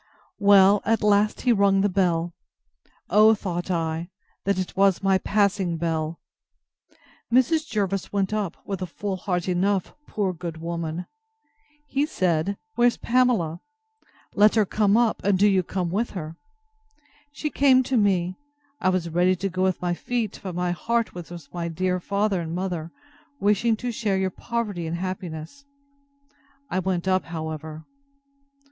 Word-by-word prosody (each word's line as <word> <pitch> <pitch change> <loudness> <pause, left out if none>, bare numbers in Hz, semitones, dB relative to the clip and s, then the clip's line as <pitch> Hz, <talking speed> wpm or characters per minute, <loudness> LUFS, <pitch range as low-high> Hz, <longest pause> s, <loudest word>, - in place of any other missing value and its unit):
Well, 200 0 +6
at 225 0 +1
last 210 0 +3
he 245 - +3
rung 200 -2 +3
the 205 - +3
bell: 175 -3 0 0.8
O, 215 +3 +6
thought 175 -3 -4
I, 165 -1 -2 0.4
that 200 -1 +1
it 185 -1 -3
was 195 -1 +3
my 195 -1 +3
passing 195 -4 +1
bell! 160 -1 -2 1.1
Mrs. 300 +6 +3
Jervis 195 -3 -2
went 200 0 0
up, 205 -5 -2
with 195 -2 -4
a 185 - -2
full 195 +3 -4
heart 180 -1 -2
enough, 185 +1 0
poor 195 -3 -1
good 170 -1 -6
woman! 170 +1 -4 0.8
He 285 +1 0
said, 185 - 0 0.2
Where's 240 -2 +3
Pamela? 230 -10 +1 0.7
Let 210 +2 +5
her 215 -2 +4
come 210 +1 +2
up, 235 -2 +2
and 195 -1 +3
do 205 +2 +5
you 190 -2 +3
come 180 -1 -3
with 220 +6 0
her. 160 -1 -6 1.0
She 300 +1 -4
came 260 -2 +4
to 260 - -2
me: 185 -4 +1 0.4
I 185 - +2
was 185 -2 0
ready 175 +3 +2
to 195 +2 -2
go 185 +1 -3
with 185 -1 0
my 175 -1 +1
feet; 230 +3 -3
but 185 -3 -6
my 180 0 0
heart 230 +5 -1
was 175 -2 -8
with 170 -5 -11
my 170 -1 -3
dear 180 +2 -1
father 200 0 0
and 165 0 -4
mother, 175 -3 -3 0.5
wishing 210 +2 +2
to 245 +2 -3
share 210 -4 -1
your 190 0 0
poverty 210 -6 -3
and 165 +1 -3
happiness. 180 - -6 1.1
I 185 - +1
went 185 -1 -2
up, 185 0 +2
however. 160 -1 -6
190 Hz, 155 wpm, -24 LUFS, 175-210 Hz, 1.1 s, Well